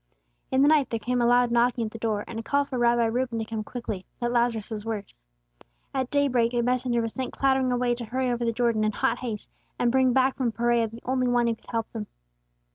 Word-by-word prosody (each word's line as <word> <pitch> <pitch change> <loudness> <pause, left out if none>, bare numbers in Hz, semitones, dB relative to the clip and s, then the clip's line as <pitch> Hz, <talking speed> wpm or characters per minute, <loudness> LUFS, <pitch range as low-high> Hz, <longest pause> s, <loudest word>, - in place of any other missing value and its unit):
In 265 +1 +3
the - - +5
night 300 -3 +4
there 230 - -2
came 245 +2 -1
a 235 - +3
loud 245 0 +4
knocking 240 0 +2
at 215 - -5
the 230 - -9
door, 215 -2 -1
and 225 - -5
a - - -3
call 285 +5 +1
for 260 -3 -4
Rabbi 240 0 +3
Reuben 240 +1 -1
to 225 - -2
come 220 -1 -4
quickly, 215 -5 -5 0.2
that 240 -1 -1
Lazarus 235 -2 0
was 210 -1 -4
worse. 210 - -6 0.7
At 260 -2 -1
day 285 0 +2
break 240 -2 +1
a 240 - +2
messenger 245 -1 +1
was 230 - -3
sent 260 -1 -4
clattering 265 -1 +2
away 245 0 +1
to 240 0 -5
hurry 255 +3 -1
over 240 0 -1
the 230 - +1
Jordan 230 -2 +1
in 215 0 +1
hot 230 +3 0
haste, 225 -5 -5 0.3
and 240 - +2
bring 260 0 +4
back 260 +1 +2
from 250 -4 0
Perea 235 0 +2
the 230 +2 -12
only 255 0 +1
One 245 -1 +2
who 230 - +2
could 225 - -15
help 230 -1 -2
them. 215 -3 -6
240 Hz, 250 wpm, -26 LUFS, 230-255 Hz, 0.7 s, the